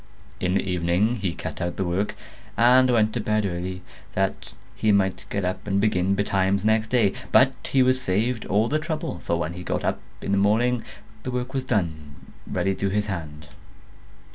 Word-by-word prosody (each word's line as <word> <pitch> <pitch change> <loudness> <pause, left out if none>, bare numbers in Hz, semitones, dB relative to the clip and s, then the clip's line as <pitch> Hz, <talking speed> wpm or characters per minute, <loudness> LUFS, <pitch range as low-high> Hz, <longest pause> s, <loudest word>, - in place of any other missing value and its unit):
In 90 0 0
the 95 - 0
evening 90 +6 +1
he 100 -4 -1
cut - - -6
out 85 0 -2
the 95 - 0
work, 90 +4 -1 0.4
and 125 +2 +6
went 110 -3 +3
to - - -1
bed 105 -1 0
early, 90 0 -4 0.3
that 95 0 -2 0.2
he 110 - +2
might 95 -2 +1
get 100 -2 -1
up 90 +2 -3
and 100 0 +1
begin 100 -2 +2
betimes 100 0 +1
next 110 0 +3
day; 110 -5 +3 0.2
but 130 +1 +6 0.2
he 135 -1 +5
was 130 0 +2
saved 110 +4 0
all 105 +3 +2
the 155 +5 +1
trouble, 155 - -4
for 85 - 0
when 85 0 -2
he 90 - -7
got 90 - -2
up - - 0 0.2
in - - -2
the 100 - +3
morning 115 +4 +2 0.4
the 130 - -5
work 125 +1 -3
was 135 -1 -2
done 80 - -2 0.3
ready 95 - 0
to 100 +1 -1
his 105 +2 0
hand. 75 -6 -6
100 Hz, 190 wpm, -24 LUFS, 90-115 Hz, 0.4 s, and